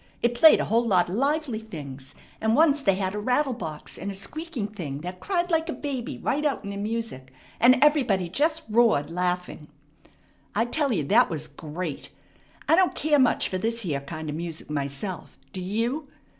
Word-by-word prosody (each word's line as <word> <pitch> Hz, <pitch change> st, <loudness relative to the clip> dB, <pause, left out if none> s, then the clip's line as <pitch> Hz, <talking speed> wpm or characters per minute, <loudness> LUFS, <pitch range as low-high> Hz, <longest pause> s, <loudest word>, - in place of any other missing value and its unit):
It 235 Hz, 0 st, +3 dB
played 310 Hz, +7 st, +7 dB
a -, -, 0 dB
whole 230 Hz, +3 st, +2 dB
lot 185 Hz, -4 st, +3 dB
of -, -, -4 dB
lively 280 Hz, -2 st, 0 dB
things, 140 Hz, -10 st, -9 dB, 0.3 s
and 220 Hz, +1 st, +2 dB
once 295 Hz, -1 st, +4 dB
they 195 Hz, -7 st, +3 dB
had 190 Hz, 0 st, -2 dB
a 210 Hz, -, -3 dB
rattle 255 Hz, +5 st, +1 dB
box 160 Hz, -8 st, -7 dB
and 195 Hz, -, -4 dB
a 200 Hz, -, -5 dB
squeaking 255 Hz, -, -4 dB
thing 150 Hz, -9 st, -6 dB
that 180 Hz, +2 st, -6 dB
cried 355 Hz, -2 st, -1 dB
like 325 Hz, 0 st, +1 dB
a -, -, -1 dB
baby 265 Hz, -5 st, -4 dB
right 295 Hz, +2 st, -1 dB
out 290 Hz, -3 st, 0 dB
in 200 Hz, -, -5 dB
the 200 Hz, -, -5 dB
music, 210 Hz, -, -4 dB, 0.3 s
and 250 Hz, +3 st, +6 dB
everybody 250 Hz, -, +3 dB
just 310 Hz, -, 0 dB
roared 215 Hz, -10 st, +3 dB
laughing. 180 Hz, -3 st, -2 dB, 0.9 s
I 225 Hz, +3 st, +2 dB
tell 280 Hz, +3 st, +1 dB
you 175 Hz, -10 st, 0 dB
that 225 Hz, -, +4 dB
was 155 Hz, -2 st, -4 dB
great. 160 Hz, -1 st, -6 dB, 0.6 s
I -, -, +6 dB
don't 370 Hz, +1 st, +3 dB
care 300 Hz, -1 st, +2 dB
much 255 Hz, -2 st, +3 dB
for 185 Hz, -, -3 dB
this 230 Hz, +3 st, -2 dB
here 150 Hz, -9 st, -2 dB
kind 155 Hz, +3 st, -7 dB
of 150 Hz, -, -3 dB
music 165 Hz, -2 st, -6 dB
myself. 145 Hz, +6 st, -4 dB, 0.2 s
Do 185 Hz, -, -5 dB
you?" 230 Hz, -, -2 dB
215 Hz, 195 wpm, -26 LUFS, 175-275 Hz, 0.9 s, played